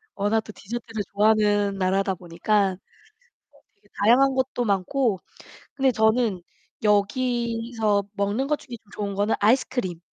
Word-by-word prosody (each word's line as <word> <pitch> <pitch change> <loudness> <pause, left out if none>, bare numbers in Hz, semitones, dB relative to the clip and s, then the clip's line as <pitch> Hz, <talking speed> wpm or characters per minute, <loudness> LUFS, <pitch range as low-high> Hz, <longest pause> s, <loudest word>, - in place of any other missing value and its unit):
워낙 205 +3 +1
또 215 - -11
디저트를 225 0 -6
좋아하는 205 -1 +2
나라다 190 +1 +1
보니까 190 +4 0 0.8
네 - - -25
되게 205 0 -29
다양한 260 +6 +4
것도 260 -1 -1
많고 205 +2 0 0.6
근데 270 -2 +2
저는 220 -4 +1 0.4
여기서 225 0 0
먹는 205 +5 -1
것 300 +1 0
중에 245 -4 -9 0.2
좋은 200 0 -3
거는 205 +2 +1
아이스크림. 225 -5 +1
215 Hz, 285 characters per minute, -24 LUFS, 200-240 Hz, 0.8 s, 다양한